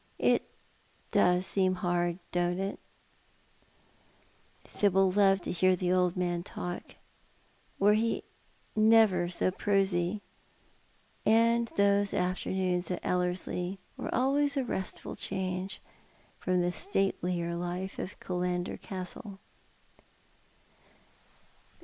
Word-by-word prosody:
It - - +3 1.0
seems 185 -1 +1
hard, 175 -1 0
don't 175 0 0
it? 195 +1 -3 0.9
" - - -33
Sibyl 195 -2 +2
loved 195 -1 +4
to - - -3
hear 185 +1 +3
the 180 0 -1
old 180 -1 +2
man 175 -1 0
talk, 175 0 -6 0.8
were 205 +1 +5
he 225 +2 0 0.5
never 215 -5 +5
so 180 +1 +2
prosy; 195 -1 +1 1.0
and 230 +2 +4
those 200 0 +3
afternoons 185 0 -1
at 180 - -4
Ellerslie 180 +1 -1 0.2
were - - -5
always 280 +3 +2
a 270 - +2
restful 190 -5 -4
change 185 0 -3 0.6
from 185 -1 +1
the 175 0 +1
statelier 180 - -1
life 180 +2 -4
of 185 - -6
Killander 180 -1 -2
Castle. 190 +2 -6
185 Hz, 100 wpm, -30 LUFS, 180-200 Hz, 1.0 s, were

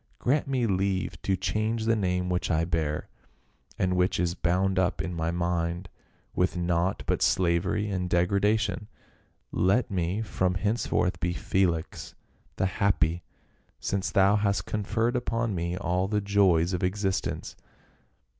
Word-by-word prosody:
" - - -36
Grant 140 +4 +1
me 130 -3 +1
leave 95 -2 -1
to 95 - +1
change 110 +3 -1
the 115 0 +3
name 90 -3 0
which 90 0 -1
I 80 -1 +2
bear, 80 -3 -1 0.7
and 90 0 +1
which 90 -1 +1
is 85 -1 +1
bound 95 +3 +1
up 95 +1 +1
in 90 - -3
my 80 -1 -1
mind 85 +1 -1 0.4
with 90 0 +1
naught 85 +1 0
but - - 0
slavery 90 +4 +2
and 90 -3 -2
degradation. 105 +5 +1 0.6
Let 100 +6 +2
me 95 +3 -1
from 90 -3 0
henceforth 100 -2 0
be 85 0 0
Felix, 85 0 -1 0.4
the - - 0
happy, 95 -4 +1 0.6
since 95 -1 -1
thou 100 +2 +4
hast 100 -1 0
conferred 110 +4 -1
upon 115 -2 -1
me 85 0 -2
all 90 0 0
the 105 +1 0
joys 95 -4 +3
of 90 - -2
existence." 95 0 -2
95 Hz, 145 wpm, -27 LUFS, 90-105 Hz, 0.7 s, thou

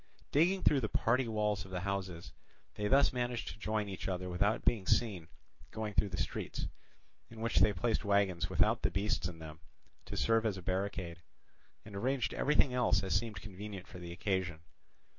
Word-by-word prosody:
Digging 180 +6 +3
through 145 - +5
the 110 - -1
party 125 +2 +2
walls 105 -3 0
of 95 - -12
the 90 -1 -3
houses, 95 -3 -4 0.4
they 105 - -2
thus 135 +4 +5
managed 120 -1 -2
to - - -9
join 105 0 -1
each 95 -2 -5
other 90 -1 -2
without 100 +6 +1
being 105 -6 +2
seen 95 -9 +1 0.4
going 110 -1 -4
through 100 - +2
the 90 - -4
streets, - - -3 0.6
in 115 - -11
which 115 +1 0
they 105 - +6
placed 110 +5 0
wagons 100 -4 +2
without - - +3
the - - +2
beasts 100 -3 0
in 90 -2 -8
them, 80 -1 -9 0.5
to - - -6
serve 115 -1 +3
as 105 -4 0
a 95 - -8
barricade, 90 -2 -2 0.6
and 105 -1 -10
arranged 130 +5 0
everything 145 -2 +3
else 105 -6 +3
as 95 - -1
seemed 105 -3 -1
convenient 100 -1 -7
for 90 - -10
the 85 -1 -7
occasion. 95 -2 -1
100 Hz, 185 wpm, -34 LUFS, 90-115 Hz, 0.6 s, they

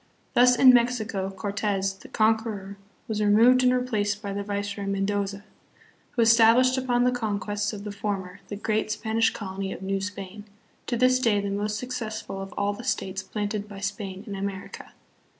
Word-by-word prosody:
Thus 250 0 +6
in 255 +1 +8
Mexico, 225 -5 +1
Corte"s 200 0 -2
the 195 - -14
conqueror 215 -3 0 0.3
was 215 -1 -2
removed 230 +5 +5
and 250 0 +4
replaced 215 -5 0
by 200 -2 -5
the 200 - -3
viceroy 200 0 -3
Mendoza, 200 0 -1 0.7
who 235 - +3
established 230 +3 +6
upon 250 -2 +1
the 250 - +3
conquests 210 -3 -2
of 205 -2 -7
the 210 - -5
former 200 -2 -4
the 205 - -5
great 215 +1 -1
Spanish 220 +1 +1
colony 195 -1 -5
of 190 - -7
New 195 0 -1
Spain, 200 +1 -7 0.4
to 240 - -1
this 255 +1 +4
day 225 -5 +2
the 200 0 -3
most 210 +1 -2
suc 250 +3 -6
cessful 215 -5 -5
of 195 0 -7
all 205 0 0
the 210 - -9
states 190 -6 -2
planted 210 +1 -4
by 200 -2 -9
Spain 200 -1 -5
in 205 - -6
America. 195 0 -6
205 Hz, 175 wpm, -26 LUFS, 200-230 Hz, 0.7 s, in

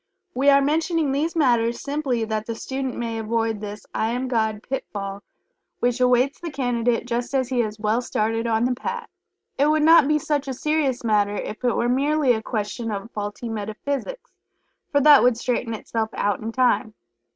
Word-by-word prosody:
We 275 +3 +3
are 280 0 +6
mentioning 315 0 +1
these 305 +5 -1
matters 240 -6 +2
simply 280 -5 -1
that 215 -1 -3
the 230 - -3
student 265 +2 -4
may 230 -1 -3
avoid 225 -1 -1
this 210 0 -7
"I 220 - 0
Am 250 +2 -2
God" 220 -3 -1
pitfall 200 -7 -5 0.6
which 245 +1 0
awaits 250 +2 +3
the 345 - -5
Candidate 245 -4 0
just 245 +2 -2
as 260 -2 +1
he 255 -2 0
has 215 -2 -1
well 215 +3 +1
started 225 0 -1
on 225 +1 +2
the 250 - +1
Path. 470 - -5 0.5
It 285 - +4
would 305 0 +3
not 320 -2 +7
be 300 0 +3
such 290 -1 -1
a 265 - -3
serious 295 -3 0
matter 205 -2 +2
if 215 +3 -5
it 245 -2 +2
were 240 - +1
merely 275 +1 +2
a 220 - -2
question 220 +1 -3
of 205 +2 -5
faulty 205 +3 -5
metaphysics, 230 - -4 0.6
for 285 - +3
that 290 -1 +8
would 245 -2 +3
straighten 235 -1 -2
itself 220 0 -3
out 205 -2 0
in 220 +1 -4
time. 245 -3 +1
245 Hz, 185 wpm, -23 LUFS, 220-275 Hz, 0.6 s, that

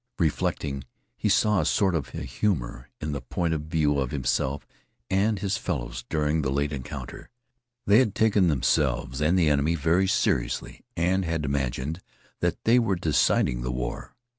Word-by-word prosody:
Reflecting, 70 -4 -1 0.3
he - - -1
saw 105 -2 +3
a - - -2
sort 95 -3 +2
of 70 -5 -3
a - - -4
humor 65 - -2
in 75 - -3
the 70 -3 -3
point 85 +5 -1
of 75 -1 -3
view 75 -3 +1
of 65 -2 -1
himself 70 0 -1 0.5
and 100 +3 +2
his 100 +2 -1
fellows 85 - -4
during 75 0 +1
the 70 - -1
late 70 +2 0
encounter. 65 -4 -7 0.6
They 100 +3 +6
had 110 -6 +1
taken 105 -4 +3
themselves 65 -2 +1
and 80 +5 +3
the 85 -3 +3
enemy 75 +3 +2
very 85 +5 +2
seriously - - -1
and 90 +3 +2
had 80 -3 -2
imagined 70 +4 -2 0.4
that - - -1
they 120 +2 +5
were 100 -5 +1
deciding 75 -7 +2
the 60 - -3
war. 60 -1 -5
75 Hz, 165 wpm, -26 LUFS, 70-95 Hz, 0.6 s, They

